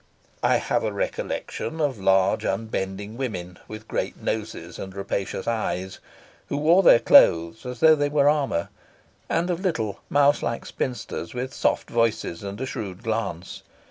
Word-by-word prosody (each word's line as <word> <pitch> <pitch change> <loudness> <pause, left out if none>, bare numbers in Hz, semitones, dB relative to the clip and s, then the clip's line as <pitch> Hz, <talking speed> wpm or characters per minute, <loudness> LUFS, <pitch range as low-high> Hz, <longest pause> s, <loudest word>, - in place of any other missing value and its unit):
I - - +3
have - - 0
a - - -1
recollection - - -4
of 140 -7 0
large, 95 0 +3
unbending 100 0 -3
women 90 -9 -5
with 110 +1 -9
great - - -3
noses - - -4
and 95 0 -7
rapacious 100 0 -3
eyes, 95 -5 -2 0.5
who 140 - -1
wore 165 +6 +5
their 180 - +8
clothes 85 +1 +5
as 125 -2 -7
though 160 0 +8
they 145 -1 +1
were 145 -1 +3
armour; 140 - +1 0.6
and 170 +2 +1
of 175 - -2
little, 120 - -2
mouse 145 0 +4
like 115 - -3
spinsters, 125 0 -4
with 130 +1 -4
soft - - 0
voices 115 -7 0
and 100 +1 -6
a 130 - -2
shrewd 100 -7 -6
glance. 100 -6 -3
115 Hz, 155 wpm, -24 LUFS, 95-145 Hz, 0.6 s, their